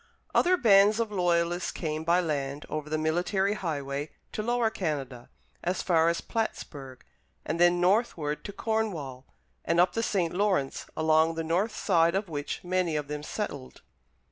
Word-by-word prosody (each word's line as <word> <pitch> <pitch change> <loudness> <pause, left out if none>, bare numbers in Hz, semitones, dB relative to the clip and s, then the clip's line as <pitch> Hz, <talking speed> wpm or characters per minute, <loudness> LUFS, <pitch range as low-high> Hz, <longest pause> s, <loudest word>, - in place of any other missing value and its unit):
Other 365 +1 +4
bands 210 - +5
of 225 -2 -1
Loyalists 175 -2 +1
came 155 -2 -3
by 170 +2 +3
land 145 -3 -3
over 155 -1 -4
the 155 - 0
military 175 +6 +1
highway 145 -6 -3 0.2
to - - -3
Lower 240 0 +1
Canada, 140 - -4 0.3
as 180 +2 -1
far 165 -2 +3
as 170 - -1
Plattsburg, 140 - -5 0.4
and 165 +2 -2
then 175 0 +5
northward 175 -6 +1
to 205 - -5
Cornwall 195 - -3 0.4
and 170 - +1
up 180 - +4
the 230 - 0
St. 185 -7 0
Lawrence, 185 -8 0
along 160 +1 +3
the 165 - -2
north 185 +7 0
side 170 -4 +2
of 195 -1 -1
which 145 -2 -4
many 180 -2 0
of 145 -1 -3
them 150 0 -4
settled. 150 -6 -6
170 Hz, 160 wpm, -28 LUFS, 150-200 Hz, 0.4 s, bands